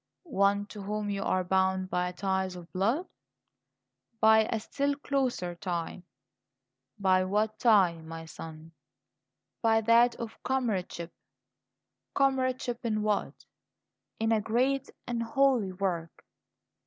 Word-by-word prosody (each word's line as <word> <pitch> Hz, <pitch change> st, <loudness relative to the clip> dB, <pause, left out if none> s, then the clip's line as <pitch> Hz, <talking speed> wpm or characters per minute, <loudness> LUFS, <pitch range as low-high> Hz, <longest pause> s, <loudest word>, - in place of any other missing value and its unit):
"One 200 Hz, -, +2 dB
to 210 Hz, -, -7 dB
whom 205 Hz, +1 st, -3 dB
you 200 Hz, -1 st, -2 dB
are 185 Hz, -1 st, +1 dB
bound 190 Hz, 0 st, +1 dB
by 180 Hz, 0 st, 0 dB
ties 190 Hz, 0 st, -1 dB
of 175 Hz, -1 st, -11 dB
blood?" 225 Hz, -, +1 dB, 1.1 s
"By 220 Hz, 0 st, +6 dB
a 225 Hz, -, 0 dB
still 280 Hz, +6 st, -1 dB
closer 265 Hz, -11 st, -1 dB
tie." 175 Hz, 0 st, -4 dB, 1.0 s
"By 185 Hz, -1 st, +3 dB
what 210 Hz, +3 st, 0 dB
tie, 195 Hz, -8 st, +4 dB
my 165 Hz, 0 st, -8 dB
son?" 160 Hz, 0 st, -10 dB, 0.9 s
"By 225 Hz, -1 st, +3 dB
that 235 Hz, +2 st, +5 dB
of 230 Hz, -2 st, -8 dB
comradeship." 200 Hz, -10 st, -2 dB, 1.0 s
"Comradeship 255 Hz, -3 st, +1 dB
in 215 Hz, -2 st, 0 dB
what?" 210 Hz, -1 st, -1 dB, 0.7 s
"In 225 Hz, 0 st, +1 dB
a 220 Hz, -1 st, +3 dB
great 255 Hz, +5 st, 0 dB, 0.2 s
and 240 Hz, -1 st, -2 dB
holy 240 Hz, -3 st, +2 dB
work." 180 Hz, -3 st, -3 dB
210 Hz, 115 wpm, -29 LUFS, 185-235 Hz, 1.1 s, By